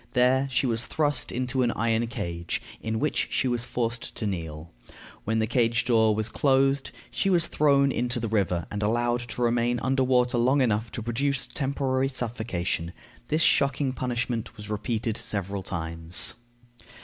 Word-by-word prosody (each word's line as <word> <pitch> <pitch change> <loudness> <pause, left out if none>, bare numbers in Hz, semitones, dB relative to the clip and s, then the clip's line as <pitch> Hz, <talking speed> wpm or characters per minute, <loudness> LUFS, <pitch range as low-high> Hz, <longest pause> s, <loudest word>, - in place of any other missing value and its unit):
There 130 +2 +3
she 130 +1 +1
was 115 -1 +2
thrust 145 -4 0
into 130 +1 -1
an 120 - +2
iron 115 +1 +1
cage, 85 -7 -3 0.2
in 110 0 -2
which 150 +1 0
she 130 - 0
was 120 -1 -1
forced 120 0 -3
to 110 - -3
kneel. 80 -4 -5 0.5
When 110 +1 0
the 110 - +2
cage 115 0 +1
door 110 -3 +4
was 110 0 0
closed, 135 +2 +2 0.2
she 195 - 0
was 175 -4 +4
thrown 140 -2 +3
into 120 0 -1
the 115 - -2
river, 95 -6 0
and 105 - -3
allowed 120 +3 +1
to 120 +3 -2
remain 120 0 +1
under 130 0 +1
water 125 -1 +2
long 130 +4 +3
enough 110 -3 +1
to 115 - -4
produce 130 +4 0
temporary 135 -1 -1
suffocation. 110 -9 -3 0.3
This 155 +2 +2
shocking 140 -1 +2
punishment 120 -2 -3
was 105 0 -8
repeated 110 +1 -2
several 100 -1 -3
times. 85 -2 0
120 Hz, 160 wpm, -26 LUFS, 110-130 Hz, 0.5 s, door